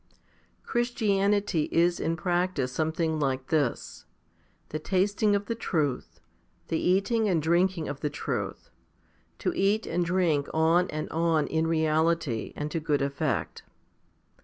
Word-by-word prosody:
7. - - -41
Christianity 205 -7 +1
is 170 +1 +2
in 165 - 0
practice 175 -7 0
something 160 +2 -1
like 135 -2 -1
this 145 -6 -1 0.6
the 155 - -3
tasting 200 +4 +1
of 200 0 -1
the 230 - -2
truth, 155 - -2 0.5
the 160 - 0
eating 200 +4 +2
and 175 -4 +2
drinking 170 +1 +1
of 140 -1 -5
the 150 - -1
truth, 145 - -4 0.7
to - - -1
eat 205 +3 +2
and 175 +1 0
drink 170 -5 +1
on 165 +3 +3
and 155 0 -4
on 165 -2 +2
in 160 0 0
reality 160 -5 +1
and 150 +1 -4
to 165 - -1
good 150 -3 0
effect. 140 -1 -2
165 Hz, 135 wpm, -27 LUFS, 155-190 Hz, 0.7 s, on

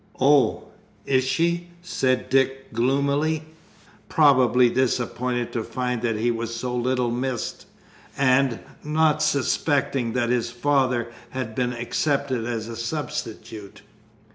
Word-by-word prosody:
"Oh, 140 +1 +4 0.4
is 130 -1 +2
she?" 170 +6 0 0.2
said 130 -7 0
Dick 135 -1 +1
gloomily, 140 +6 +1 0.7
probably 130 -4 +5
disappointed 125 -1 -1
to 115 - -1
find 125 -1 -3
that 115 -2 0
he 120 +2 +1
was 115 0 -3
so 125 +1 -3
little 125 0 0
missed, 125 0 -3 0.5
and 130 -2 +3 0.2
not 155 0 +2
suspecting 140 -4 +1
that 120 -2 0
his 120 -1 +1
father 125 -2 +1 0.2
had 125 -3 -4
been 125 +1 -1
accepted 130 0 -1
as 115 -2 -3
a 115 - -6
substitute. 115 -6 -5
130 Hz, 115 wpm, -24 LUFS, 120-140 Hz, 0.7 s, probably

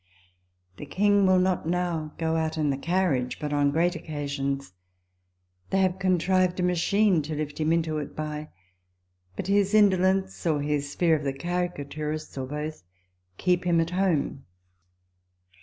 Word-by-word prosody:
The 145 - -8
King 205 +4 +3
will 185 0 +5
not 185 -3 +1
now 170 -3 -2
go 160 -1 0
out 160 0 -1
in 150 -2 +1
the - - 0
carriage 165 -8 0
but 150 -1 -3
on 145 -1 +3
great 170 +5 +1
occasions. 140 - -4 1.0
They 195 - +1
have 185 0 +1
contrived 185 0 +2
a - - +1
machine 180 +1 +2
to 155 +1 -5
lift 150 0 -4
him 155 0 +1
into 160 -2 0
it 145 - -7
by; 150 0 -5 0.9
but - - -4
his 200 +1 +2
indolence, 190 -2 +3
or 155 -3 +2
his 145 -1 -2
fear 170 -2 +3
of 150 - -3
the 135 -1 -1
caricaturists, 155 -2 -4
or 130 -1 -4
both, 150 +2 -5 0.6
keep 180 -1 +1
him 175 -2 +2
at 165 +1 0
home. 180 -7 0
165 Hz, 155 wpm, -26 LUFS, 150-185 Hz, 1.0 s, will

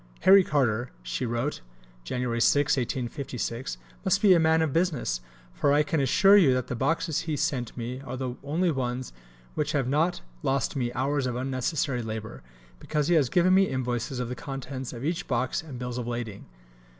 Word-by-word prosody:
"Harry 195 0 +7
Carter," 125 -6 +1
she - - -3
wrote 120 +6 -2 0.4
(Jan. 125 - -3
6, 135 +4 +3
1856), 125 - -3 0.3
"must 190 +1 +2
be 200 -3 +6
a 175 - +5
man 160 0 +4
of 150 -4 -1
business; 155 - 0 0.3
for 140 - +1
I 150 +1 +4
can 150 +1 -1
assure 195 +9 +5
you 145 -10 +5
that 130 - -1
the - - -4
boxes 165 +4 0
he 150 - 0
sent 125 -4 -2
me 125 +2 -4
are 130 -1 -6
the 125 -1 -3
only 165 +5 +1
ones 125 - -3 0.4
which 150 +1 -1
have 135 -4 +1
not 155 +6 +1 0.2
lost 135 +1 0
me 120 -3 -1
hours 135 0 0
of 125 - -3
unnecessary 130 +1 -1
labour, 110 0 -6 0.4
because 150 0 -1
he - - +4
has 145 -7 +3
given 180 +1 +4
me 195 0 +5
invoices 125 0 -2
of 125 - -2
the 125 - -4
contents 135 -1 -6
of 120 +2 -6
each 170 +2 -2
box 125 -1 0
and 150 -6 -9
bills 125 0 -4
of 120 - -4
lading." 120 -4 -5
130 Hz, 185 wpm, -27 LUFS, 120-155 Hz, 0.4 s, Harry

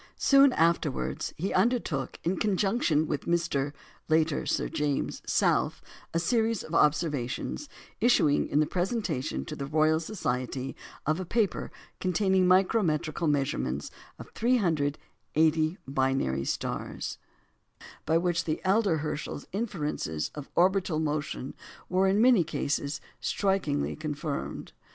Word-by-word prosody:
Soon 275 -1 +6
afterwards, 165 -4 0
he 185 +7 -2
undertook, 205 - 0
in 180 +2 0
conjunction 195 -6 +2
with 150 -2 -3
Mr. 165 -5 0 0.4
(later 160 -1 +2
Sir - - 0
James) 150 -3 -2
South, - - +2 0.3
a - - 0
series 225 +4 +1
of 155 - -9
observations, 150 - 0 0.3
issuing 185 -11 +3
in 145 - +1
the 155 - +4
presentation 175 - -2
to 155 - -6
the 140 -2 -5
Royal 155 +1 +3
Society 130 - -3 0.3
of 155 +4 +1
a - - -2
paper 210 +2 0 0.3
containing 185 0 +2
micrometrical 180 -4 +2
measurements 135 - -1 0.3
of - - -11
380 160 - +1
binary 130 - 0
stars, - - -3 0.9
by 160 +1 +4
which 175 0 0
the 155 -1 -1
elder 195 -3 +3
Herschel's 150 -1 -4
inferences 150 - -3
of 150 -2 -8
orbital 185 -2 +3
motion 150 -3 -2 0.4
were, 185 +1 +3
in 195 +2 +3
many 235 -5 +6
cases, 145 -2 -2 0.2
strikingly 190 -8 0
confirmed. 150 -1 -4
160 Hz, 120 wpm, -28 LUFS, 145-190 Hz, 0.9 s, Soon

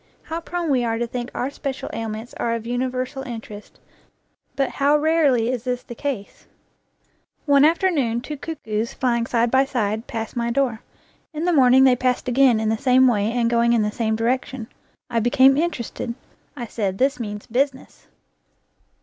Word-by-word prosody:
How 330 +1 -5
prone 345 -2 -3
we 255 -3 +2
are 225 -1 -1
to 240 - -1
think 240 +1 -5
our 260 +3 -2
special 275 -2 -5
ailments 225 +1 -5
are 230 0 0
of 230 -1 -6
universal 255 +2 -2
interest, 225 -5 -9 0.8
but 275 -1 +1
how 285 +1 +3
rarely 295 -7 +2
is 245 -3 -3
this 250 -1 -2
the - - -9
case! 240 -5 -5 1.0
One 285 -2 +5
afternoon 300 - +2
two 300 +4 -6
cuckoos, 235 -8 -4
flying 235 -2 0
side 235 -1 +1
by 265 +1 +5
side, 220 -3 -2
passed 225 +1 -5
my 235 -1 -1
door. 240 -3 0 0.5
In 310 +2 -3
the 355 - +2
morning 260 -2 +6
they 260 -2 +6
passed 250 0 -1
again 250 -2 +4
in 220 0 0
the 220 0 0
same 260 0 +5
way 215 -2 +1
and 235 -1 +1
going 235 0 +3
in 230 -2 +3
the 210 - -1
same 220 0 -1
direction. 250 +1 -2 0.4
I 235 -2 0
became 260 +3 +5
interested. 265 -6 -3 0.4
I 240 - -4
said, 200 -4 -3
This 270 +3 +1
means 210 -3 -5
business. 265 +3 -2
245 Hz, 175 wpm, -22 LUFS, 230-270 Hz, 1.0 s, morning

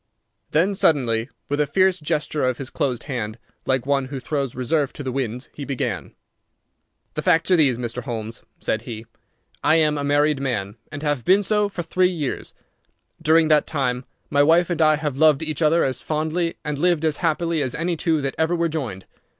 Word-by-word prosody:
Then 180 +6 +2
suddenly, 125 - +2 0.2
with 145 0 -1
a 150 - +1
fierce 185 +4 +3
gesture 150 0 -1
of 130 -1 +1
his 135 -2 -7
closed 130 -4 -1
hand, 115 -6 -4 0.3
like 130 -2 +1
one 140 -1 +1
who 135 +1 -6
throws 140 -1 -3
reserve 140 +3 0
to 145 - -7
the 130 - -3
winds, 125 -1 -3
he 145 - -7
began. 135 -2 -3 1.0
"The 155 - -2
facts 165 +1 +2
are - - +7
these, 140 -7 +3
Mr. 120 0 -4
Holmes," 115 -2 -5 0.2
said 110 - -1
he. 115 -2 -7 0.6
"I 155 - +5
am 150 -2 +3
a - - -2
married 145 0 +2
man, 110 -6 -2
and 145 +1 -6
have 145 -5 0
been 195 - +4
so 210 +1 +1
for 180 -3 -5
three 180 +2 +2
years. 155 -8 -4 0.7
During 160 0 +4
that 150 -1 +4
time 130 -4 -1 0.3
my 145 -1 +4
wife 165 +4 +4
and 170 - 0
I 155 -1 +5
have 150 -3 -3
loved 155 -1 +5
each 155 0 -3
other 165 +2 +4
as 130 -1 -1
fondly 160 +2 -1
and 150 -1 -2
lived 170 -1 +2
as 155 -2 +1
happily 165 -1 0
as 130 -3 -2
any 170 +2 -1
two 160 -1 +1
that 135 -1 -2
ever 160 +2 +2
were 170 -1 +1
joined. 125 - -4
150 Hz, 200 wpm, -22 LUFS, 130-160 Hz, 1.0 s, are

